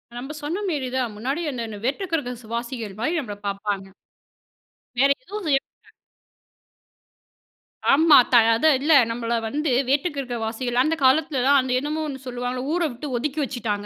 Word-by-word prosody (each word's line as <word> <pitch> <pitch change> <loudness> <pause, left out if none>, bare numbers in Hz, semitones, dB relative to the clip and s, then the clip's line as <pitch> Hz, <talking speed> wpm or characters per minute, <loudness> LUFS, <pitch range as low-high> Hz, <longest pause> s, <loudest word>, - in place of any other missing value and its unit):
நம்ம 270 +5 -6
சொன்னமேரி 315 -5 -2
தான், 240 -4 -1
முன்னாடி 270 +10 -2
என்ன 225 -4 -5
வேற்றுக்கிரகவாசிகள் 245 - -3
மாரி 320 +9 0
நம்மள 210 -7 -5
பார்ப்பாங்க. 200 -1 -3 1.1
வேற 275 +2 +5 0.2
எதுவும் 415 -5 -6
செய்ய 275 -2 +4
மாட்டங்க. - - -27 2.0
ஆமா. 315 +1 +7
த - - +4 0.2
அதான் 295 +2 +4
இல்ல 310 +3 +1 0.2
நம்மள 235 0 -2
வந்து, 295 +3 -1 0.2
வேட்டுக்கிரகவாசிகள், 250 -5 -1
அந்த 325 +1 +1
காலத்தில 270 0 +3
தான் 280 -1 +6
அந்த 255 -1 -4
என்னமோ 305 +3 -3
ஒண்ணு 270 -2 -6
சொல்லுவாங்கல்ல 250 +2 -3
ஊர 350 - 0
வுட்டு 250 +5 -7
ஒதுக்கி 300 +4 -3
வச்சுட்டாங்க 215 -6 -3
260 Hz, 135 wpm, -23 LUFS, 235-300 Hz, 2.0 s, ஆமா